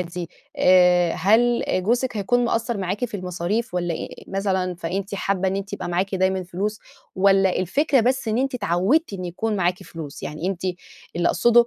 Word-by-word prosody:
دي، 175 Hz, -1 st, -5 dB, 0.3 s
آآ 180 Hz, -2 st, +5 dB
هل 230 Hz, +7 st, +3 dB
جوزِك 235 Hz, +5 st, 0 dB
هيكون 245 Hz, +5 st, +1 dB
مقصّر 235 Hz, 0 st, 0 dB
معاكِ 195 Hz, +5 st, -2 dB
في 220 Hz, -3 st, -4 dB
المصاريف 180 Hz, +4 st, -3 dB
والّا 175 Hz, -1 st, -1 dB
إيه، -, -, -5 dB, 0.2 s
مثلًا 190 Hz, -2 st, -1 dB
فأنتِ 185 Hz, +4 st, -4 dB
حابّة 195 Hz, -1 st, 0 dB
إن 195 Hz, -, -1 dB
أنتِ 200 Hz, 0 st, -5 dB
يبقى -, -, -4 dB
معاكِ 185 Hz, +3 st, -1 dB
دايمًا 190 Hz, 0 st, +1 dB
فلوس 195 Hz, +4 st, -3 dB, 0.4 s
والّا 195 Hz, -1 st, +4 dB
الفكرة 270 Hz, -, +2 dB
بس 250 Hz, 0 st, 0 dB
إن 220 Hz, -, +1 dB
أنتِ 265 Hz, 0 st, 0 dB
اتعوّدتِ 200 Hz, -, +1 dB
إن 185 Hz, -2 st, -5 dB
يكون 205 Hz, +5 st, -2 dB
معاكِ 180 Hz, 0 st, 0 dB
فلوس؟ 160 Hz, -6 st, -9 dB
يعني 155 Hz, +3 st, -4 dB
أنتِ 190 Hz, -2 st, -3 dB, 0.5 s
اللي 175 Hz, -, +2 dB
أقصده 235 Hz, +5 st, +4 dB
190 Hz, 175 wpm, -23 LUFS, 180-225 Hz, 0.5 s, آآ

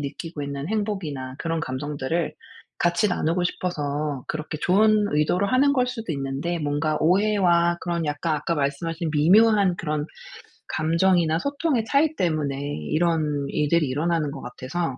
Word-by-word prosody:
느끼고 150 Hz, +2 st, -6 dB
있는 140 Hz, +2 st, -4 dB
행복이나 175 Hz, -12 st, -3 dB
그런 165 Hz, -1 st, -2 dB
감정들을 145 Hz, +3 st, -3 dB, 0.4 s
같이 175 Hz, +4 st, +2 dB
나누고 175 Hz, 0 st, 0 dB
싶어서 150 Hz, -6 st, -2 dB
그렇게 155 Hz, 0 st, -4 dB
좋은 210 Hz, +4 st, +3 dB
의도로 155 Hz, +6 st, +2 dB
하는 265 Hz, +6 st, +3 dB
걸 255 Hz, -3 st, +2 dB
수도 225 Hz, -8 st, -4 dB
있는데 140 Hz, +5 st, -3 dB
뭔가 150 Hz, 0 st, -1 dB
오해와 175 Hz, -2 st, +3 dB
그런 170 Hz, -2 st, -2 dB
약간 150 Hz, +2 st, -1 dB
아까 150 Hz, +3 st, -2 dB
말씀하신 160 Hz, +4 st, -2 dB
미묘한 195 Hz, +4 st, +4 dB
그런 150 Hz, -2 st, -2 dB, 0.6 s
감정이나 165 Hz, 0 st, +2 dB
소통의 280 Hz, -, -1 dB
차이 295 Hz, +5 st, +2 dB
때문에 155 Hz, -, -1 dB, 0.3 s
이런 155 Hz, -3 st, +1 dB
일들이 150 Hz, +1 st, +1 dB
일어나는 150 Hz, +2 st, 0 dB
것 -, -, -8 dB
같아서 130 Hz, +3 st, -4 dB
165 Hz, 335 characters per minute, -24 LUFS, 145-185 Hz, 0.6 s, 미묘한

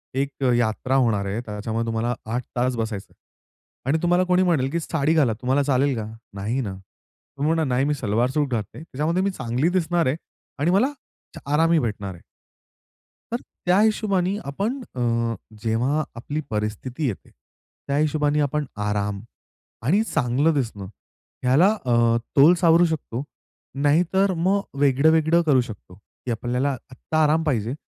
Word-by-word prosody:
"एक 140 Hz, 0 st, -2 dB
यात्रा 120 Hz, +3 st, 0 dB
होणार 115 Hz, -6 st, +2 dB
आहे, 100 Hz, +4 st, -2 dB
त्याच्यामुळे 110 Hz, +2 st, -3 dB
तुम्हाला 115 Hz, +1 st, -1 dB, 0.2 s
8 125 Hz, +1 st, -1 dB
तास 125 Hz, +1 st, +1 dB
बसायचं 110 Hz, -4 st, -4 dB, 0.7 s
आणि 140 Hz, +4 st, +2 dB
तुम्हाला 175 Hz, +1 st, +3 dB
कोणी 180 Hz, +1 st, +4 dB
म्हणेल, 155 Hz, -8 st, +2 dB
की 170 Hz, -, 0 dB
साडी 160 Hz, -1 st, 0 dB
घाला." 140 Hz, -8 st, +3 dB
तुम्हाला 135 Hz, +3 st, +2 dB
चालेल 135 Hz, -1 st, +2 dB
का? 110 Hz, -, -3 dB, 0.3 s
नाही 110 Hz, +7 st, -2 dB
ना? 100 Hz, -6 st, -4 dB
तुम्ही 140 Hz, +10 st, -5 dB
म्हणा, 165 Hz, -1 st, +1 dB
"नाही, 135 Hz, +3 st, +2 dB
मी 150 Hz, -, +1 dB
सलवार-सूट 130 Hz, +4 st, 0 dB
घालते, 110 Hz, -5 st, -3 dB
त्याच्यामध्ये 165 Hz, +4 st, -1 dB
मी 200 Hz, -, +1 dB
चांगली 135 Hz, +1 st, -1 dB
दिसणार 170 Hz, 0 st, 0 dB
आहे 130 Hz, -, +1 dB, 0.4 s
आणि 165 Hz, +4 st, +2 dB
मला 230 Hz, +10 st, +3 dB, 0.4 s
च -, -, -7 dB
आरामही 165 Hz, +1 st, +4 dB
भेटणार 105 Hz, -6 st, -3 dB
आहे." 85 Hz, -, -15 dB, 1.1 s
तर -, -, +2 dB, 0.3 s
त्या 185 Hz, +3 st, +4 dB
हिशोबाने 200 Hz, -3 st, +1 dB
आपण 205 Hz, -, -2 dB
अ, 115 Hz, -1 st, 0 dB, 0.3 s
जेव्हा 125 Hz, +7 st, +1 dB
आपली 145 Hz, +6 st, -4 dB
परिस्थिती 110 Hz, +7 st, -3 dB
येते, 105 Hz, -, -6 dB
त्या 140 Hz, -, -9 dB
हिशोबाने 150 Hz, 0 st, +1 dB
आपण 150 Hz, +1 st, 0 dB, 0.2 s
आराम 105 Hz, -1 st, -1 dB, 0.7 s
आणि 200 Hz, +9 st, +4 dB
चांगलं 140 Hz, -, +1 dB
दिसणं 115 Hz, -8 st, -2 dB, 0.6 s
ह्याला 135 Hz, +9 st, +5 dB, 0.2 s
अ, 120 Hz, -2 st, +3 dB, 0.2 s
तोल 150 Hz, +6 st, +8 dB
सावरू 170 Hz, 0 st, +5 dB
शकतो, 140 Hz, -6 st, -3 dB, 0.5 s
नाहीतर 170 Hz, +7 st, +2 dB
मग 190 Hz, +4 st, +2 dB, 0.2 s
वेगळं-वेगळं 160 Hz, +4 st, +4 dB
करू 135 Hz, -4 st, +5 dB
शकतो, 110 Hz, -6 st, -8 dB
की 105 Hz, +5 st, -11 dB
आपल्याला 125 Hz, +4 st, -1 dB, 0.2 s
आत्ता 155 Hz, +5 st, -1 dB
आराम 155 Hz, +2 st, +3 dB
पाहिजे. 120 Hz, -5 st, 0 dB
135 Hz, 150 wpm, -23 LUFS, 115-160 Hz, 1.1 s, तोल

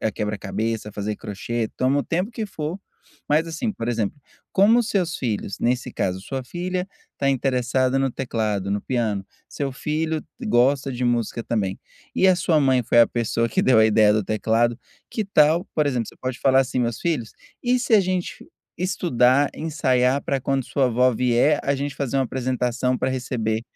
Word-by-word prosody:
eh, 110 Hz, -, 0 dB
quebra-cabeça, 105 Hz, +1 st, -3 dB
fazer 105 Hz, +1 st, -3 dB
crochê, 110 Hz, +3 st, -3 dB
toma 135 Hz, +3 st, +2 dB
o -, -, -3 dB
tempo 180 Hz, +7 st, -1 dB
que 225 Hz, -2 st, -4 dB
for, 160 Hz, -1 st, -5 dB, 0.5 s
mas, 155 Hz, +3 st, +2 dB
assim, 165 Hz, +7 st, -3 dB
por 115 Hz, -, -5 dB
exemplo, 115 Hz, 0 st, -1 dB, 0.4 s
como 220 Hz, +5 st, +5 dB
seus 185 Hz, -6 st, -1 dB
filhos, 105 Hz, -5 st, -3 dB
nesse 125 Hz, +1 st, 0 dB
caso 95 Hz, 0 st, -2 dB
sua 130 Hz, +5 st, -5 dB
filha 180 Hz, +4 st, -3 dB, 0.3 s
tá 140 Hz, -, 0 dB
interessada 130 Hz, 0 st, +1 dB
no 135 Hz, -1 st, +1 dB
teclado, 105 Hz, -6 st, -2 dB
no 100 Hz, 0 st, 0 dB
piano, 110 Hz, -6 st, -1 dB, 0.2 s
seu 140 Hz, -2 st, -3 dB
filho 155 Hz, +3 st, -2 dB, 0.2 s
gosta 135 Hz, -, +2 dB
de 125 Hz, 0 st, -2 dB
música 120 Hz, -1 st, -1 dB
também 100 Hz, -5 st, -2 dB, 0.4 s
e 190 Hz, -, +4 dB
a 185 Hz, -, +5 dB
sua 165 Hz, -3 st, +2 dB
mãe 130 Hz, -2 st, +3 dB
foi 120 Hz, +1 st, +4 dB
a 115 Hz, -, +7 dB
pessoa 115 Hz, 0 st, -1 dB
que -, -, +1 dB
deu 130 Hz, -3 st, +5 dB
a 110 Hz, -, +6 dB
ideia 105 Hz, -1 st, +5 dB
do 105 Hz, -1 st, +1 dB
teclado, 115 Hz, +3 st, +1 dB, 0.3 s
que 220 Hz, -, -2 dB
tal, 165 Hz, -2 st, +3 dB
por 150 Hz, -2 st, +2 dB
exemplo, 125 Hz, -5 st, -1 dB
você -, -, -12 dB
pode 130 Hz, -1 st, -3 dB
falar 135 Hz, 0 st, +4 dB
assim: 130 Hz, -1 st, -1 dB
"Meus 115 Hz, -1 st, -1 dB
filhos, 145 Hz, -10 st, -1 dB, 0.3 s
e 250 Hz, +1 st, +2 dB
se 240 Hz, -2 st, +2 dB
a 210 Hz, -, +7 dB
gente 185 Hz, -1 st, -3 dB, 0.3 s
estudar, 145 Hz, -7 st, +2 dB
ensaiar 135 Hz, -4 st, +1 dB
pra 140 Hz, -, -1 dB
quando 135 Hz, +1 st, 0 dB
a -, -, -16 dB
sua 135 Hz, -3 st, +2 dB
vó 125 Hz, +2 st, +3 dB
vier, 125 Hz, +5 st, +3 dB
a 140 Hz, -, +1 dB
gente 140 Hz, +1 st, -3 dB
fazer 135 Hz, -1 st, -2 dB
uma 135 Hz, -, +2 dB
apresentação 125 Hz, 0 st, -1 dB
pra 130 Hz, -, 0 dB
receber 115 Hz, -3 st, -2 dB
130 Hz, 185 wpm, -23 LUFS, 115-150 Hz, 0.5 s, a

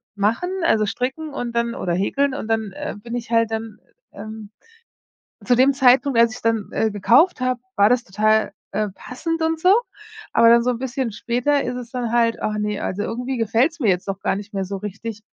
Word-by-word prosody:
machen“, 220 Hz, -, 0 dB
also, 215 Hz, -8 st, +3 dB
Stricken 265 Hz, +8 st, -3 dB
und 245 Hz, -3 st, -4 dB
dann 235 Hz, 0 st, 0 dB
oder 175 Hz, -, -2 dB
Häkeln 270 Hz, +9 st, 0 dB
und 225 Hz, -, -5 dB
dann, 220 Hz, -3 st, -1 dB
äh, -, -, -6 dB
bin 235 Hz, +3 st, -7 dB
ich 235 Hz, -1 st, -5 dB
halt 230 Hz, -1 st, +2 dB
dann, 220 Hz, -1 st, -5 dB, 0.3 s
ähm 215 Hz, -1 st, -9 dB, 0.9 s
zu 245 Hz, -1 st, +2 dB
dem 265 Hz, +2 st, +5 dB
Zeitpunkt, 265 Hz, -1 st, +4 dB
als 230 Hz, -1 st, +5 dB
ich -, -, -11 dB
dann, 225 Hz, -2 st, 0 dB
äh, 220 Hz, -, +1 dB
gekauft 245 Hz, -, +3 dB
habe, 255 Hz, -1 st, 0 dB, 0.2 s
war 200 Hz, +1 st, +5 dB
das 245 Hz, 0 st, +2 dB
total, 215 Hz, +3 st, +1 dB, 0.2 s
äh, 215 Hz, -1 st, -1 dB
passend 325 Hz, -, -4 dB
und 320 Hz, 0 st, 0 dB
so. 365 Hz, +4 st, +5 dB, 0.6 s
Aber 230 Hz, 0 st, +5 dB
dann 235 Hz, 0 st, +6 dB
so 250 Hz, -1 st, 0 dB
bisschen 260 Hz, -2 st, -3 dB
später 245 Hz, +6 st, 0 dB
ist 250 Hz, 0 st, -3 dB
es 245 Hz, -1 st, -7 dB
dann 245 Hz, -3 st, -2 dB
halt: 230 Hz, -1 st, +2 dB
„Ach 210 Hz, 0 st, -1 dB
ne, 210 Hz, -1 st, -2 dB
also 205 Hz, +2 st, -3 dB
irgendwie 250 Hz, +4 st, -3 dB
gefällt's 230 Hz, +9 st, +1 dB
mir 225 Hz, -, +1 dB
jetzt 185 Hz, +1 st, 0 dB
doch 195 Hz, 0 st, -3 dB
gar -, -, 0 dB
nicht 205 Hz, +2 st, -8 dB
mehr 195 Hz, -, -1 dB
so 195 Hz, +1 st, -5 dB
richtig.“ 210 Hz, +2 st, -6 dB
230 Hz, 205 wpm, -21 LUFS, 215-255 Hz, 0.9 s, dann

